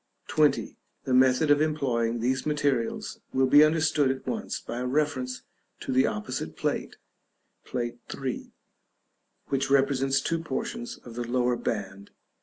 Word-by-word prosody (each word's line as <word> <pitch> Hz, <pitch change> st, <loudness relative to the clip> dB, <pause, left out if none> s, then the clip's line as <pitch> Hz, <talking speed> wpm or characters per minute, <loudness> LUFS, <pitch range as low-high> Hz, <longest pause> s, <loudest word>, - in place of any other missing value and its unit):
§ -, -, -5 dB
XX. -, -, +2 dB, 0.3 s
The 130 Hz, -, -1 dB
method 130 Hz, +4 st, +4 dB
of 145 Hz, 0 st, +5 dB
employing 120 Hz, -7 st, 0 dB
these 130 Hz, +2 st, 0 dB
materials 145 Hz, -6 st, -1 dB
will 130 Hz, 0 st, +3 dB
be 145 Hz, +3 st, +7 dB
understood 155 Hz, -3 st, +3 dB
at 130 Hz, 0 st, -3 dB
once 220 Hz, -2 st, -3 dB
by 120 Hz, -, -6 dB
a 125 Hz, -, -2 dB
reference 130 Hz, -2 st, -1 dB, 0.4 s
to -, -, -4 dB
the 130 Hz, +1 st, +4 dB
opposite 105 Hz, -7 st, -4 dB
plate -, -, -2 dB, 0.7 s
(Plate 120 Hz, -1 st, -3 dB
III.), 130 Hz, -2 st, -4 dB, 1.0 s
which 135 Hz, 0 st, 0 dB
represents 135 Hz, -1 st, +3 dB
two 165 Hz, +4 st, -1 dB
portions 230 Hz, -, -4 dB
of 120 Hz, -, -9 dB
the 120 Hz, +1 st, -3 dB
lower 125 Hz, 0 st, +1 dB
band. 100 Hz, -4 st, -4 dB
130 Hz, 145 wpm, -27 LUFS, 120-145 Hz, 1.0 s, be